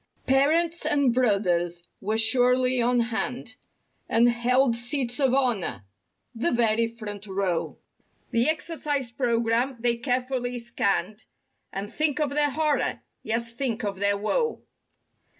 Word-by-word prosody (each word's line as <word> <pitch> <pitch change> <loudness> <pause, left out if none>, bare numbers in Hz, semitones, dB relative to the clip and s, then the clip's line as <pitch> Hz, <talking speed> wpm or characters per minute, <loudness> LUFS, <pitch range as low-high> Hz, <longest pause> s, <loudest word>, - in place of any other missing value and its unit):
Parents 320 +6 +2
and 280 -4 +2
brothers 180 -8 +1 0.2
were 215 +3 -1
surely 250 +2 +3
on 245 0 +2
hand 245 +1 -3 0.5
And 235 +1 +4
held 245 +1 +2
seats 245 +1 -1
of 270 -3 +3
honor—the 230 - -3
very 230 -1 +2
front 215 -3 -8
row. 190 -3 -2 0.5
The 235 +5 +2
"Exercise 300 -5 -2
Program" 235 +1 0
they 235 0 +1
carefully 250 0 -2
scanned 215 -4 -2 0.5
And—think 255 +10 -1
of 295 -2 0
their 295 0 +2
horror! 300 +1 0 0.2
Yes, 230 +1 -2
think 240 -1 -3
of 200 -2 -3
their 200 0 +2
woe! 460 - -1
240 Hz, 115 wpm, -26 LUFS, 220-265 Hz, 0.5 s, And